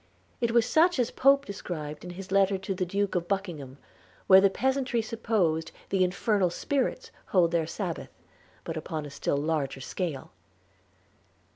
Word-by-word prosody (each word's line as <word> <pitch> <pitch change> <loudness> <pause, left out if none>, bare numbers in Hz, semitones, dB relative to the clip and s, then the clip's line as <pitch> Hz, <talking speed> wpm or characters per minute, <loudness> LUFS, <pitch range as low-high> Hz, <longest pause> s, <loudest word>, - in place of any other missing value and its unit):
It 235 -2 +1
was 230 -1 +4
such 345 +2 +4
as 245 -2 +1
Pope 275 +1 +4
describes 155 - -6
in 180 - -7
his 195 -1 -8
letter 195 0 +3
to 195 +1 -4
the 185 -1 -2
Duke 200 +2 -1
of 175 -1 -1
Buckingham, 170 -9 -3 0.5
where 190 0 +8
the 200 - +5
peasantry 265 +2 0
supposed 215 -8 0 0.2
the 190 -1 +2
infernal 190 +1 +1
spirits 280 - -2 0.2
hold 175 -3 +3
their 165 -2 +1
Sabbath; 175 -1 -4 0.5
but 165 - -5
upon 155 -1 -4
a 145 - -8
still 140 0 -1
larger 145 -2 -1
scale. 150 - -4
190 Hz, 155 wpm, -28 LUFS, 160-225 Hz, 0.5 s, where